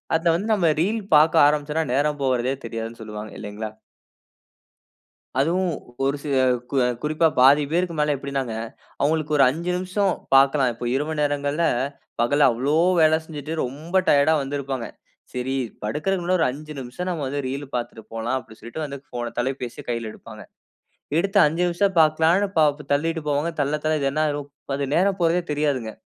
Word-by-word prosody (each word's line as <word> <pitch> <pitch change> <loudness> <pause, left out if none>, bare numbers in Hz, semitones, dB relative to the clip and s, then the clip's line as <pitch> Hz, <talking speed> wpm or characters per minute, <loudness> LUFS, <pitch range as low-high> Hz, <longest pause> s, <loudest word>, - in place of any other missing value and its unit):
அத 165 - -1
வந்து 195 +6 -2
நம்ம 170 -6 +3
ரீல் 215 +4 0
பார்க்க 155 -1 +6
ஆரம்பிச்சோம்னா, 150 +2 0
நேரம் 145 +2 +1
போகுறதே 130 0 +1
தெரியாதுனு 115 0 -6
சொல்வாங்க, 105 0 -7
இல்லைங்களா. 105 +1 -6 1.7
அதுவும், 175 +5 +1 0.3
ஒரு 140 +1 +1
சில 145 -2 -1 0.3
கு - - -4
அ - - +2 0.2
குறிப்பா 155 +2 +2
பாதி 140 +3 +6
பேருக்கு 175 -1 0
மேல 150 0 +2
எப்டினாங்க. 135 -4 -3 0.5
அவங்களுக்கு 155 +1 +1
ஒரு 135 - +6
5 165 +6 -3
நிமிஷோ 185 +3 -1 0.3
பார்க்கலாம். 135 -1 +4
இப்போ 120 - -7
இரவு 150 +3 -1
நேரங்கள்ல 145 +2 0 0.6
பகல்ல 145 +4 +4
அவ்ளோ 135 +6 0 0.2
வேல 155 0 +5
செஞ்சுட்டு 155 -1 -7
ரொம்ப 150 +8 -7
டயர்ட்டா 145 +2 +5
வந்திருப்பாங்க. 135 -3 -3 0.5
சேரி 125 +1 -2 0.3
படுக்கிறதுக்கு 170 - -1
முன்னாடி 185 +1 +2
ஒரு 160 - +3
5 150 +3 -9
நிமிஷம், 130 +9 -6
நம்ம 165 -5 -3
வந்து 145 +2 -2
ரீல்லு 140 +2 -4
பார்த்துட்டு 120 -2 -4
போலாம் 115 +3 -1
அப்பிடினு 110 -4 -11
சொல்லிட்டு 120 +8 -6
வந்து 140 -1 -6 0.2
போன 120 -1 -3
தொலைபேசிய 130 -1 -3
கையில 115 -2 -2
எடுப்பாங்க. 110 -1 -12 0.8
எடுத்த 195 +3 -1
5 165 +4 0
நிமிஷ 175 +3 0 0.2
பாக்கலானு 160 +5 +4
பா 155 - +6 0.3
தள்ளிட்டு 165 +3 0
போவாங்க. 145 +3 0
தள்ள, 145 +1 +1
தள்ள 155 - +2
இது 140 - +1
என்னாயிரும்? 145 -2 -1 0.3
அது 140 0 -1
நேரம் 190 +3 +2
போறதே 170 +1 +2
தெரியாதுங்க. 145 -7 -1
145 Hz, 160 wpm, -23 LUFS, 130-160 Hz, 1.7 s, பார்க்க